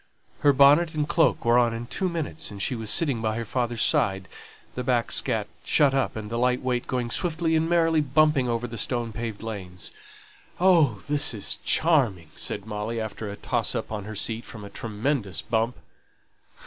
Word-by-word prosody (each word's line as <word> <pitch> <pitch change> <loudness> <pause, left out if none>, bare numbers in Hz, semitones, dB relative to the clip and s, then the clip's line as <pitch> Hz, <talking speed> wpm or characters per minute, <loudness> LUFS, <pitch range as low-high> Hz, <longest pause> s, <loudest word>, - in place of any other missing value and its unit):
Her 145 - +5
bonnet 145 +5 +5
and 150 -1 0
cloak 165 -7 +2
were 120 +1 +5
on 120 -1 +2
in 115 +1 -5
two 185 +9 -2
minutes, 160 -2 -4
and 100 - -9
she 100 - -1
was 110 -3 -4
sitting 135 -3 0
by 110 -1 -1
her 115 - -3
father's 120 -1 -1
side, 95 -1 +1 0.5
the 125 - -4
back 120 -2 +1
seat 110 -5 0 0.2
shut 145 -3 +3
up, 135 -1 0
and 110 -1 -6
the 115 - -1
light 125 +1 +1
weight 125 -1 -1
going 125 -2 -2
swiftly 165 0 0
and 160 +1 +1
merrily 165 -2 +3
bumping 145 -2 +3
over 115 0 -1
the 115 -2 -6
stone 120 -1 -1
paved 115 -1 -5
lanes. 95 -5 -6 0.7
"Oh, 175 -5 +4
this 145 -4 +1
is 100 - -2
charming!" 120 - +2
said 100 - -2
Molly, 110 +2 -4
after 110 -1 -5
a 100 - -6
toss - - -1
up - - -4
on 105 -2 -4
her 110 +1 -7
seat 115 +3 -3
from 110 -3 -10
a 100 - -10
tremendous 110 -1 -2
bump. 115 +1 0
120 Hz, 190 wpm, -25 LUFS, 110-145 Hz, 0.7 s, Her